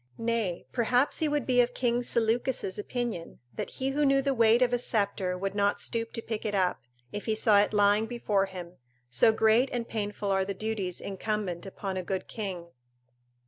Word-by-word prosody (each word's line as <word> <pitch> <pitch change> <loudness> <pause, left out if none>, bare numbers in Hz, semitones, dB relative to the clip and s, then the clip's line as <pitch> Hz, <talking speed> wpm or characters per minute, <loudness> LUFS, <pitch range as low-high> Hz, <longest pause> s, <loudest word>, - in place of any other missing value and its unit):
Nay, 225 -6 -1
perhaps 250 +3 +2
he 315 - +1
would 290 -4 0
be 250 -1 +4
of 245 0 -1
King 240 -1 +1
Seleucus' 230 -3 0
opinion, 230 -5 -4 0.2
that - - -4
he 265 0 -2
who 290 +2 0
knew 275 -1 +4
the 275 0 +1
weight 230 0 +5
of 245 0 +1
a 245 - +2
sceptre 200 -5 0
would 195 +1 -3
not 205 0 +1
stoop 230 -1 -3
to 230 - -4
pick 220 -2 -4
it 210 -2 -1
up, 185 -6 +1 0.3
if 205 - -5
he 220 - +1
saw 215 -1 +5
it 205 - +2
lying 205 +1 +3
before 210 -5 0
him, 180 -2 -9 0.3
so 125 - +5
great 220 +4 +3
and 235 -1 -3
painful 205 -2 -3
are 190 0 +2
the 195 +1 -4
duties 200 -4 -3
incumbent 195 -2 -3
upon 195 0 -5
a 185 - -2
good 190 +1 -3
king. 185 -6 -5
215 Hz, 195 wpm, -28 LUFS, 195-240 Hz, 0.3 s, weight